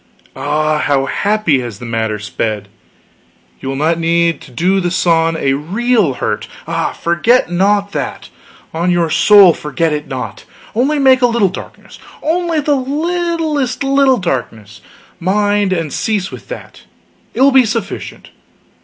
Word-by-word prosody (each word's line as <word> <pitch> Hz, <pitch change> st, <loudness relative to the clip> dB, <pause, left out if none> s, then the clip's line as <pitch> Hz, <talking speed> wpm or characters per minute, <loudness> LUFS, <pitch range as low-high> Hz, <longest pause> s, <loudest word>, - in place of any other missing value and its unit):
Ah 155 Hz, 0 st, 0 dB
how 140 Hz, -2 st, +1 dB
happy 200 Hz, -4 st, +1 dB
has 120 Hz, -5 st, -6 dB
the 120 Hz, -, -9 dB
matter 110 Hz, -2 st, -2 dB
sped! 105 Hz, 0 st, -4 dB, 0.9 s
You 135 Hz, -, -5 dB
will 135 Hz, -, -3 dB
not 160 Hz, +4 st, 0 dB
need 170 Hz, 0 st, +1 dB
to -, -, -13 dB
do 180 Hz, +10 st, +1 dB
the 180 Hz, -2 st, -1 dB
sun 165 Hz, -2 st, +1 dB
a 135 Hz, -3 st, +1 dB
real 195 Hz, -, +1 dB
hurt -, -, -3 dB, 0.2 s
ah, -, -, -1 dB
forget 175 Hz, +5 st, +1 dB
not 200 Hz, +3 st, +1 dB
that, -, -, -5 dB, 0.4 s
on 170 Hz, +3 st, 0 dB
your 170 Hz, -2 st, +1 dB
soul 200 Hz, -1 st, +7 dB
forget 150 Hz, +2 st, -2 dB
it 150 Hz, 0 st, -4 dB
not! 130 Hz, -1 st, -6 dB, 0.3 s
Only 270 Hz, +7 st, +1 dB
make 265 Hz, -2 st, +4 dB
a 245 Hz, -, +5 dB
little 230 Hz, -5 st, +2 dB
darkness 185 Hz, -, -11 dB, 0.2 s
only 335 Hz, 0 st, 0 dB
the 295 Hz, 0 st, +1 dB
littlest 310 Hz, -1 st, -1 dB
little 275 Hz, -1 st, +3 dB
darkness, 110 Hz, -, -4 dB, 0.4 s
mind, 205 Hz, +2 st, +1 dB
and 165 Hz, -5 st, -2 dB
cease 205 Hz, -4 st, -1 dB
with -, -, -10 dB
that. -, -, -9 dB, 0.5 s
It -, -, -1 dB
will 275 Hz, +1 st, +6 dB
be 265 Hz, -1 st, +6 dB
sufficient. 220 Hz, -3 st, -5 dB
185 Hz, 150 wpm, -15 LUFS, 150-245 Hz, 0.9 s, soul